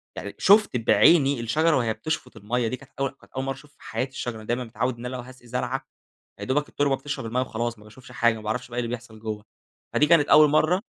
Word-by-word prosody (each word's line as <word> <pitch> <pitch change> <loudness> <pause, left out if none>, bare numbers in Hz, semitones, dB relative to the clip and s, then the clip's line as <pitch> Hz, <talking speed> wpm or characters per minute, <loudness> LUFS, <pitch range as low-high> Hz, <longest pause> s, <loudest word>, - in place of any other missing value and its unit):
يعني 100 - -6
شُفت 205 - +5
بعيني 135 +5 +5
الشجرة 155 +7 +2
وهي 115 -3 +1
بتشفُط 155 -5 -4
المَيّة 115 +3 -1
دي 130 - -2
كانت 135 +1 -17
أول 135 -1 +1
كانت 135 - -23
أول 130 0 -2
مرّة 135 0 -2
اشوف 145 +2 -16
في - - -31
حياتي 125 +4 -3
الشجرة 120 -4 -5
دايمًا 120 +3 -1
متعوّد 120 +3 -2
إن 120 - -8
أنا 125 +1 -4
لو 125 - -4
هاسقي 125 0 -14
زرعة 125 +1 -2 0.5
يادوبَك 145 +3 -1
التربة 145 -1 +1
بتشرب 145 -4 -5
المَيّة 125 +3 0
وخلاص، 120 -2 -3
ما 105 - -16
باشوفش 125 +4 -14
حاجة 115 -1 +3
ما 110 - -9
باعرفش 110 +4 -3
بقى 120 - -8
إيه - - +1
اللي 115 - -4
بيحصل 110 -2 -15
جوا 110 -2 -5 0.5
فدي 150 - +4
كانت 155 -2 +5
أول 155 -1 +8
مرة 165 +6 +3
125 Hz, 235 wpm, -25 LUFS, 115-140 Hz, 0.5 s, أول